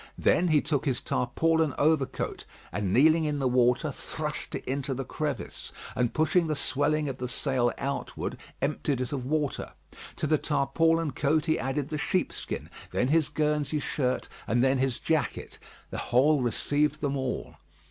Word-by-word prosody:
Then 180 - +3
he 155 -3 +4
took 145 -4 -1
his 130 -4 +1
tarpaulin 160 +4 +1
overcoat, 150 -2 0 0.3
and 95 +1 -1
kneeling 155 - +5
in 150 -1 0
the 135 -2 +1
water, 125 -1 +3
thrust - - -4
it - - -5
into 135 +1 -2
the 135 +1 -4
crevice, 150 +2 -4 0.2
and 125 -2 +1
pushing 160 +2 +2
the 155 - 0
swelling 145 +2 +1
of 130 -2 -4
the 125 - -2
sail 125 -1 +1
outward, 140 0 -3 0.3
emptied 140 -2 0
it 125 - -3
of 130 -3 -3
water. 150 -1 -1 0.4
To - - -2
the 155 0 +3
tarpaulin 160 +2 +2
coat 150 +4 +1
he 160 -1 +1
added 135 +2 -2
the 155 -2 -3
sheepskin, 185 +4 -2 0.2
then 125 - 0
his 155 0 +3
Guernsey 150 -1 0
shirt, 130 -3 -1 0.2
and 120 +4 +2
then 135 0 +3
his 130 -2 +1
jacket. 160 -3 -2 0.3
The - - -3
hole 140 +4 +3
received 145 +5 0
them 140 -1 0
all. 130 -2 -3
145 Hz, 165 wpm, -28 LUFS, 130-155 Hz, 0.4 s, kneeling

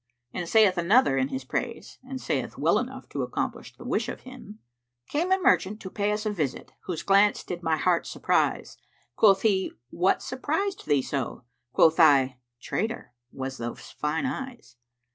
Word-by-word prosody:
'" 120 0 -49
And 175 -2 -4
saith 205 -5 +5
another 180 - +4
in 130 -1 +1
his 130 -1 -5
praise 230 - -4
and 260 0 -6
saith - - -3
well - - +3
enough - - -6
to - - -3
accomplish - - -4
the - - -11
wish - - -1
of - - -6
him, 255 -5 -11 0.5
"Came 340 +5 -1
a 380 - +5
merchant 195 - +2
to 190 - -7
pay 205 0 0
us 210 +1 -2
a 215 - 0
visit 155 -10 -3
* - - -48
Whose 175 -4 -4
glance 200 +1 +4
did 175 -1 -6
my 160 -2 +1
heart 175 0 +1
surprise: - - 0 0.4
Quoth 195 -3 +5
he, 195 -4 +1 0.2
'What 180 +3 +1
surprised 320 +10 -2
thee 145 -3 +3
so?' 135 -3 -4
* 120 0 -53
Quoth 160 +1 +4
I, 135 -5 +5 0.2
'Trader, 220 - -3 0.2
'twas 135 0 -6
those 120 0 -6
fine 150 - -2
eyes.'" 260 - -6
185 Hz, 180 wpm, -26 LUFS, 145-225 Hz, 0.5 s, saith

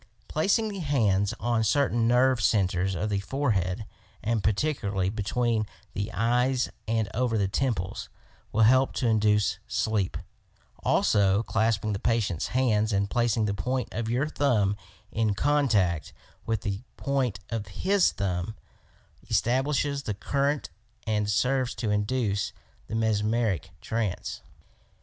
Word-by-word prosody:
Placing 205 +7 +1
the 200 -2 -5
hands 110 - +2
on 120 -2 +1
certain 120 -1 +2
nerve 125 +1 +4
centres 95 -3 +2
of 90 +5 -2
the 100 - +1
forehead, 105 -4 -1 0.4
and 110 -1 0
particularly 100 -5 0
between 110 +1 0 0.3
the 100 +2 -3
eyes 125 +4 +1 0.2
and 110 -1 +1
over 120 -1 +1
the 100 -2 +1
temples, 100 -3 -2 0.4
will 110 - +3
help 130 +4 +4
to 125 - 0
induce 105 -3 +2
sleep; 105 -4 0 0.7
also 100 0 +3
clasping 110 -1 0
the 100 - -3
patient's 105 -8 0
hands 115 -4 +1
and 100 0 0
placing 120 -2 +2
the 100 - 0
point 125 +6 -2
of 110 0 -3
your 125 +5 +1
thumb 115 -10 +1 0.4
in 110 -2 +1
contact 105 - +1 0.3
with 110 -3 0
the 100 0 -3 0.2
point 130 -8 -1
of 110 -3 -3
his 190 - +2
thumb 95 +1 -2 0.7
establishes 140 +3 +1
the 105 -7 -3
current 140 +6 -1 0.3
and 105 -2 0
serves 125 +4 +1
to 110 -3 -2
induce 105 -1 0 0.3
the 110 - -4
mesmeric 110 -4 0
trance. 110 -5 -3
110 Hz, 130 wpm, -27 LUFS, 100-125 Hz, 0.7 s, nerve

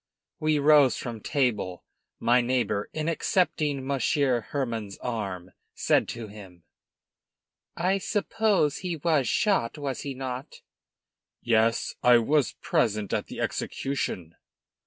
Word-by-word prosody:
We 155 0 +2
rose 145 -3 +5
from 115 -3 -6
table. 105 - -1 0.4
My 120 +1 +4
neighbor 120 -4 0
in 155 0 -3
accepting 155 -5 0
Monsieur 135 -2 +1
Hermann's 115 -8 -3
arm, 95 -7 -4 0.2
said - - +2
to 115 -1 -6
him 95 -4 -13 1.1
"I 185 +3 +1
suppose 205 -6 +1
he 180 -3 -3
was 155 -3 +1
shot, 210 - +1
was 140 -3 -3
he 140 -2 -5
not?" 130 0 -6 0.8
"Yes. 115 0 +2
I 125 -1 +7
was 140 +4 +2
present 105 -3 0
at - - -1
the - - -8
execution." 95 - -3
130 Hz, 115 wpm, -27 LUFS, 115-150 Hz, 1.1 s, I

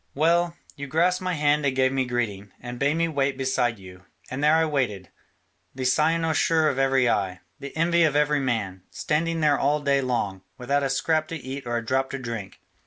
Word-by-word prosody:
Well, 170 +3 +2 0.2
you 140 -1 -6
grasped 175 +6 +1
my 185 -1 -1
hand 150 0 +2
and 135 -2 0
gave 130 0 +3
me 135 -1 +1
greeting, 105 -5 -3
and 120 0 -8
bade 140 +2 +2
me 165 0 +2
wait 140 -3 -1
beside 130 -3 0
you, 90 -2 -14 0.3
and 135 +3 -3
there 150 +1 +5
I 160 0 +3
waited, 120 - -2 0.6
the 130 -1 -4
cynosure 160 +3 +2
of 135 - -2
every 135 -2 +3
eye, 95 -5 -1 0.2
the 140 +2 -8
envy 170 +1 +2
of 155 -3 +3
every 150 0 +2
man, 110 -8 -2
standing 165 +2 -1
there 150 -2 +3
all 145 +2 +2
day 140 -1 +1
long, 115 -7 -2 0.2
without 140 +3 0
a 135 - 0
scrap 155 +3 0
to 165 - -5
eat 135 -2 -7
or 120 0 -1
a 115 - -4
drop 130 +3 0
to 140 - -4
drink. 115 -6 -6
135 Hz, 205 wpm, -25 LUFS, 120-155 Hz, 0.6 s, there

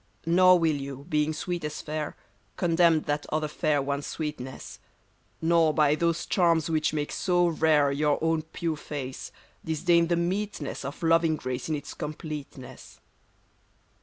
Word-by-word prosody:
Nor 185 +2 +6
will 160 -3 +1
you, 140 0 -7
being 150 -1 +1
sweet 175 +2 -4
as 150 0 -4
fair, 155 0 -4 0.4
Condemn 170 -2 +3
that 145 0 -2
other 155 0 0
fair 150 -1 0
one's 140 +1 -3
sweetness; 150 -5 -6 0.6
Nor 165 -2 +3
by 150 -2 +4
those 170 +1 0
charms 165 -4 +2
which 155 -1 +1
make 150 -1 -2
so 175 -1 +2
rare 155 -4 +3
Your 145 +1 +1
own 160 -1 +2
pure 160 0 -4
face, 135 -3 -6 0.3
disdain 170 +1 +2
the 170 - +2
meetness 175 -4 -2
Of 140 +5 -7
loving 165 -1 +3
grace 130 0 -4
in 155 - +1
its 145 -1 -7
completeness. 150 -3 -8
155 Hz, 145 wpm, -27 LUFS, 145-170 Hz, 0.6 s, Nor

